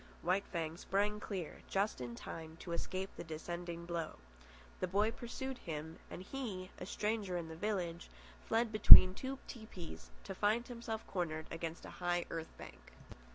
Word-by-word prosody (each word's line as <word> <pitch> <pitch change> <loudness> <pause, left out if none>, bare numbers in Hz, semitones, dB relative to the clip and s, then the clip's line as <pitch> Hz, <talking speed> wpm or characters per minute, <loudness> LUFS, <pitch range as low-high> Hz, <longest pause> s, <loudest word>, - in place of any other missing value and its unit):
White 185 +3 +2
Fang 165 -2 -2
sprang 205 +3 0
clear, 190 -6 -5
just 195 -7 0
in 120 -1 -5
time 160 +5 -8
to 175 - -7
escape 185 +3 -3
the - - -6
descending 170 +1 -5
blow. 170 -2 -3 0.6
The 185 - 0
boy 205 +4 +2
pursued 245 +3 -5
him, 160 0 -6
and 180 - -7
he, 200 -6 -5
a 180 - -6
stranger 210 -3 -1
in 165 -2 -4
the 160 - -7
village, 175 -3 -2 0.3
fled 230 0 +1
between 200 -3 +11
two 265 +7 -4
tepees 215 -8 -9
to 195 - -5
find 215 +5 +1
himself 230 -2 -5
cornered 160 -4 -2
against 165 0 -5
a - - -8
high 175 0 +1
earth 165 -1 -4
bank. - - -12
185 Hz, 160 wpm, -36 LUFS, 165-210 Hz, 0.6 s, between